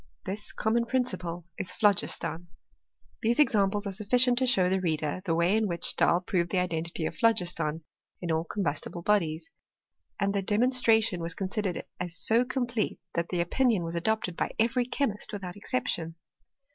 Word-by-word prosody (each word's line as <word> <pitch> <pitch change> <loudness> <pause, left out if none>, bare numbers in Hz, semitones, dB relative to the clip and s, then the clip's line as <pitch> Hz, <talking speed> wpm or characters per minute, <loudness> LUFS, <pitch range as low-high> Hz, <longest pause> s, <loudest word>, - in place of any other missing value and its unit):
This 205 +2 -4
common 235 +2 +1
principle 180 -10 -2
is 180 - -1
phlogiston. 180 -4 +1 0.7
These 230 +2 +1
examples 205 -7 +3
are 200 - -2
sufficient 245 +5 +3
to 260 - +1
show 190 -7 +4
the 190 +1 +1
reader 155 -1 -1
the 165 -3 +1
way 170 +4 +3
in 220 -1 +2
which 170 -2 -3
Stahl 175 - +3
proved 180 -2 0
the 190 - -1
identity 170 -2 -1
of - - -3
phlogiston 175 -9 +1 0.4
in 175 -2 -3
all 160 0 +1
combustible 170 -1 -3
bodies. 165 -6 0 0.7
And 200 -1 +1
the 200 - 0
demonstration 225 -2 +3
was 165 0 -4
considered 195 -1 -2 0.2
as 175 -1 -3
so 225 +8 +4
complete 245 -3 -2
that 170 0 -1
the 175 -2 0
opinion 220 +2 +2
was 165 0 -4
adopted 180 +1 -1
by - - -2
every 240 +2 +1
chemist 240 -7 -2
without 185 -3 -5
exception. 165 -2 -2
190 Hz, 160 wpm, -28 LUFS, 170-225 Hz, 0.7 s, show